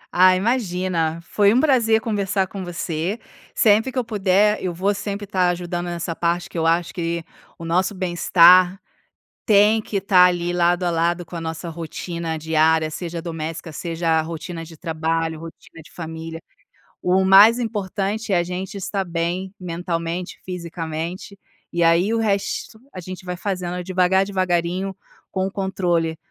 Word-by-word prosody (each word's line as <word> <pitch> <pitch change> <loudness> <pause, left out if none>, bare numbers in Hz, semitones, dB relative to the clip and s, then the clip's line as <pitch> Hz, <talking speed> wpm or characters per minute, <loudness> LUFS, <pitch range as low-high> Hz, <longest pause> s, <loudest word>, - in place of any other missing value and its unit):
Ah, 185 +1 +6
imagina, 185 -7 0
foi 200 +3 +3
um 255 - +5
prazer 240 -7 +3
conversar 200 -3 -1
com 190 0 -7
você. 175 +3 -3 0.4
Sempre 220 +4 +4
que 260 - -9
eu 255 - +2
puder, 210 0 +2
eu 185 - -1
vou 190 +4 0
sempre 205 0 -4
tá 185 -3 +1
ajudando 175 0 -3
nessa 170 -1 -4
parte 175 +1 -1
que - - -17
eu 165 -1 +1
acho 170 +1 +1
que 170 -2 -3 0.3
o 165 - -8
nosso 185 +4 +1
bem-estar 180 0 +5 0.7
tem 210 +1 +5
que 200 -2 -3
tá 185 -2 +5
ali 175 -1 +1
lado 175 0 +2
a 175 - +1
lado 170 +1 0
com 175 - -9
a 165 - -4
nossa 165 +1 -5
rotina 165 0 -5
diária, 160 0 +2
seja 170 +1 -5
doméstica, 165 -1 -5
seja 165 0 -1
rotina 165 +1 -6
de 165 0 -12
trabalho, 160 0 -2
rotina 165 0 -12
de - - -18
família. 165 -1 -7 0.6
O 190 +1 +3
mais 205 +5 +7
importante 210 -1 -2
é 180 - +4
a 175 - +1
gente 185 +3 -5
estar 195 0 -2
bem 175 +2 -3
mentalmente, 170 0 -4
fisicamente. 170 +1 -5 0.4
E 170 0 0
aí, 170 +6 +3
o - - +1
resto 210 +1 -2 0.2
a 185 - -6
gente 185 +1 -9
vai 180 0 -3
fazendo 180 -2 -3
devagar, 185 +1 +2
devagarinho, 185 0 -1 0.3
com 190 -1 -2
um - - -4
controle, 175 -4 -1
180 Hz, 160 wpm, -22 LUFS, 165-195 Hz, 0.7 s, mais